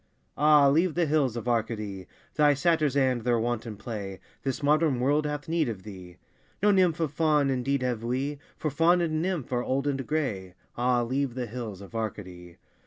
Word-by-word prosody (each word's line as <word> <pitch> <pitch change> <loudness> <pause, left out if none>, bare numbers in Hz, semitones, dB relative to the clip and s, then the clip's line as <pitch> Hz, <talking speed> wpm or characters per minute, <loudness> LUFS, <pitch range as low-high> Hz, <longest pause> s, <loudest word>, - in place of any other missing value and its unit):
Ah, 150 -1 +5
leave 160 +4 +2
the 175 -1 +2
hills 140 -6 +1
of 120 - -5
Arcady, 110 -5 -2 0.3
Thy 145 -1 +4
satyrs 155 -2 +1
and 130 -3 +2
their 120 +1 +1
wanton 115 -2 -3
play, 100 -4 -6 0.2
This 135 +1 -3
modern 150 -2 +3
world 145 +4 +2
hath 150 -1 -4
need 160 -4 +1
of 100 -5 -6
thee. 90 -4 -11 0.5
No 210 - +6
nymph 180 -5 +3
of 160 -4 0
Faun 150 -4 +2
indeed 130 +1 0
have 120 -3 -2
we, 135 +4 -2 0.2
For 155 - -2
Faun 165 +5 +4
and 155 -2 0
nymph 175 -7 -2
are 120 - +1
old 135 +2 -1
and 135 -2 -2
grey, 105 - -2 0.2
Ah, 120 0 +2
leave 130 +1 -1
the 125 -1 -2
hills 110 -4 -6
of 100 - -12
Arcady! 90 -6 -6
130 Hz, 185 wpm, -27 LUFS, 115-150 Hz, 0.5 s, No